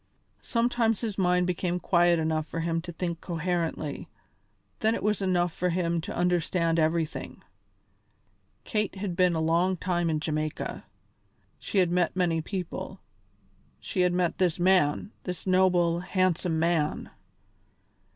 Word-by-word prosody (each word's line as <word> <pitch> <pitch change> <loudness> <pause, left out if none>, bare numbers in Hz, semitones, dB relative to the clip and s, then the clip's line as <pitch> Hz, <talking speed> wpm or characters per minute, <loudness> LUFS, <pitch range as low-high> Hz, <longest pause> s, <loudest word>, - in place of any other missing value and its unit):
Sometimes 230 -2 +1
his 220 -4 -3
mind 180 -1 +3
became 180 0 -1
quiet 175 -1 +3
enough 160 -1 -1
for 165 - -4
him 165 0 -1
to 175 +1 -7
think 170 0 -4
coherently, 165 -3 -3 0.7
then 220 +1 +2
it - - -5
was 210 0 +2
easy 195 - -3
enough 175 -2 +1
for 180 - -1
him 170 -1 0
to 200 +6 -6
understand 175 -1 +1
everything. 160 0 -1 1.2
Kate 210 -3 -1
had 190 -2 -4
been 180 -2 +3
a - - 0
long 170 +4 +2
time 175 -1 0
in 155 -1 0
Jamaica; 155 0 -3 0.7
she - - -4
had 180 -3 +4
met 175 -1 +1
many 170 -3 +1
people; 185 +2 -5 0.8
she 185 - -2
had 180 0 +3
met 175 -1 0
this 180 -2 +1
man, 185 +1 +2
this 180 -2 -5
noble, 180 -2 +3
handsome 180 -2 0
man. 160 -2 0
175 Hz, 140 wpm, -27 LUFS, 165-185 Hz, 1.2 s, had